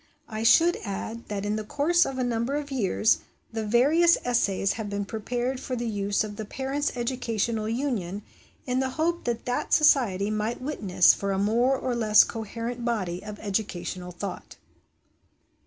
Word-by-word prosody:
I 215 -1 -5
should 330 +9 +5
add 220 +3 -5
that 205 -1 -4
in 210 +1 -1
the 215 - -3
course 315 +10 +2
of 265 - -5
a 255 - 0
number 240 +3 -1
of 295 -1 -4
years 220 -3 +2 0.3
the 225 -1 -3
various 290 +11 +4
essays 200 -5 +1
have 220 -2 -5
been 200 0 -3
prepared 245 +4 -3
for 255 - -4
the 240 -1 -3
use 205 -2 0
of 205 -1 -7
the 220 - -4
Parents' 270 +5 -3
Educational 230 -3 -1
Union 220 -6 -2 0.4
in 250 0 0
the 265 0 0
hope 340 +2 0
that 235 -1 -2
that 245 - -1
Society 215 -10 +4
might 215 +2 -2
witness 210 - +3
for 200 0 -3
a 195 - 0
more 235 +7 +2
or 255 -1 -2
less 215 -3 +6
coherent 230 +2 -5
body 190 -7 -2
of 210 0 -7
educational 190 -3 -3
thought. 195 +3 -7
230 Hz, 170 wpm, -26 LUFS, 205-255 Hz, 0.4 s, less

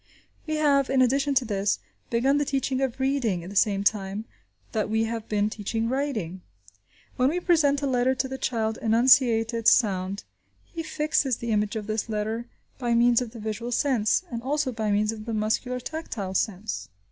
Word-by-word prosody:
We 310 - -1
have, 285 -3 +3
in 265 0 +2
addition 275 +3 +2
to 255 - +3
this, 200 -2 0 0.3
begun 265 +5 +2
the - - +2
teaching 270 -1 -1
of 265 -1 -2
reading 260 -10 0
at 180 - -8
the - - -9
same 200 0 +2
time 200 0 0 0.5
that 215 -2 -1
we 220 +1 +1
have 225 -1 -4
been 210 -1 +1
teaching 225 +2 -3
writing. 235 - -2 0.8
When 255 +1 +3
we 345 +4 -1
present 295 -6 +2
a - - +2
letter 260 -1 +2
to 265 - -1
the 265 0 -6
child 220 -3 -1
and 225 -1 +2
enunciate 235 -2 +4
its 230 -1 +4
sound, 195 -3 +1 0.4
he 335 - -7
fixes 300 -5 0
the 235 -1 -4
image 210 0 0
of 215 -2 -3
this 220 +1 -2
letter 220 +2 -2 0.3
by 240 -2 +1
means 235 +1 +4
of 245 - -4
the 230 0 -11
visual 220 +3 -4
sense, 245 - +2
and 235 -1 -4
also 285 +1 -1
by 220 -2 -2
means 210 +1 +2
of 215 -1 -8
the 230 -1 -3
muscular 220 +4 -1
tactile 245 -9 -5
sense. 205 - -2
235 Hz, 195 wpm, -26 LUFS, 215-265 Hz, 0.8 s, enunciate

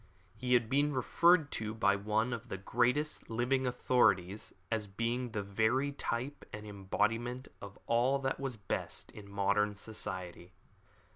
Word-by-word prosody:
He 125 -1 +2
had 120 -2 +3
been 145 +4 +2
referred 160 +4 +4
to 110 0 -3
by 100 -3 +3
one 110 +4 0
of 120 +1 -6
the 95 - -3
greatest 125 +9 0
living 125 +3 +1
authorities 110 -6 +2 0.2
as 110 -2 -1
being 115 +5 -2
the 105 -3 -3
very 110 +8 +1
type 140 0 -3
and 105 0 -7
embodiment 105 +5 -1
of 100 -1 -9
all 120 +4 +3
that 135 -1 -2
was 135 -4 -3
best 100 -3 -4
in 100 -2 -11
modern 100 +1 +1
science. 95 -5 -6
115 Hz, 145 wpm, -33 LUFS, 100-125 Hz, 0.2 s, referred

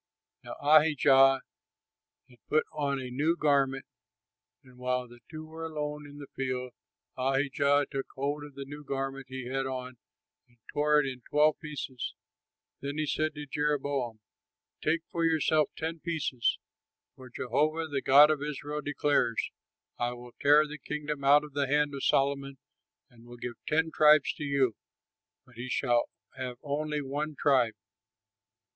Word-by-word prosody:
Now - - -7
Ahijah 140 -3 +5 0.9
had 125 -2 -21
put 155 - +3
on 140 -2 -1
a 125 -1 -6
new 150 +6 +1
garment, 135 -3 +2 0.8
and 130 -1 -18
while 125 0 -1
they 120 0 -15
two 155 0 -8
were 160 +1 -9
alone 150 -2 -4
in 145 0 -12
the 145 - -8
field, 125 -2 -3 0.4
Ahijah 140 +2 +2
took 135 -2 -3
hold 145 +2 -2
of 145 -2 -11
the 140 0 -6
new 145 +2 -9
garment 135 -1 -4
he 130 -1 -6
had 135 +1 -2
on 130 -1 -5 0.5
and 120 - -29 0.2
tore 150 0 +4
it 145 - +1
in 130 -2 -5
twelve 150 +1 +3
pieces. 145 -4 -5 0.7
Then 140 +1 -4
he 155 - 0
said 155 +1 -1
to 150 0 -6
Jeroboam, 140 -5 -1 0.6
"Take 165 +2 +1
for 170 - -1
yourself 155 -1 +3
ten 165 +1 -3
pieces; 155 -7 -1 0.6
for 130 -1 -12
Jehovah, 155 +7 0
the 140 -3 -2
God 145 +3 +7
of 150 -2 -1
Israel, 150 0 -4
declares, 145 -4 0 0.5
'I 120 0 0
will 120 0 -11
tear 150 +2 +6
the 150 +1 -8
kingdom 150 0 -4
out 145 +2 +6
of 150 -2 -10
the 140 -1 0
hand 145 +1 +2
of 140 - -5
Solomon 140 0 +1 0.5
and 120 0 -18
will 120 0 -11
give 120 0 -5
ten 160 +1 +1
tribes 150 -1 +5
to - - -7
you, 140 -4 +2 0.7
but 120 -3 -20
he 125 +2 -6
shall 120 -2 +1 0.3
have 125 -2 -5
only 150 +1 -2
one 145 +3 -3
tribe.'" 125 -6 +3
140 Hz, 155 wpm, -29 LUFS, 130-150 Hz, 0.9 s, God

